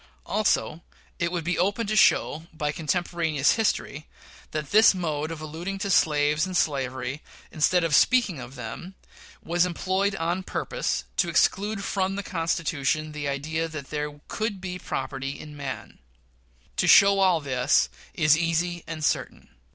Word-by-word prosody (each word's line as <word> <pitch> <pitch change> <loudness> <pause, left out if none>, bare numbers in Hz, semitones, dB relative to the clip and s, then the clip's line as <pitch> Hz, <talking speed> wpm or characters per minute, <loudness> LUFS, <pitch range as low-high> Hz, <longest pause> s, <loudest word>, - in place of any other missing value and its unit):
Also, 190 -5 0 0.4
it 170 0 0
would 175 -2 -2
be 180 +3 -1
open 205 +5 +1
to 215 +1 -1
show, 160 -5 +3
by 150 -2 -2
contemporaneous 160 -2 0
history, 160 -9 -1 0.4
that 150 -2 -5
this 215 -1 +6
mode 155 -4 -2
of 165 -1 -6
alluding 165 +6 -5
to 195 0 -2
slaves 150 -2 +3
and 185 -1 -2
slavery, 130 -2 -1 0.3
instead 175 +3 +2
of 165 -2 0
speaking 215 - +4
of 130 +1 -9
them, 125 - -7 0.5
was 175 +1 +2
employed 190 +3 0
on 175 +1 -1
purpose - - -2
to - - +2
exclude 205 0 +1
from 195 -1 -1
the 200 - -4
Constitution 155 -4 -1
the 150 -1 -4
idea 155 +4 -2
that 155 -4 -8
there 150 -1 -4
could 215 -3 -3
be 180 -1 -5
property 135 -2 -4
in 150 -1 -10
man. 140 -2 -7 0.8
To - - +2
show 200 0 +7
all 185 -3 +4
this, 130 -4 +2 0.3
is 150 0 +5
easy 170 +1 -1
and 155 -2 -3
certain. - - -2
165 Hz, 150 wpm, -26 LUFS, 150-185 Hz, 0.8 s, show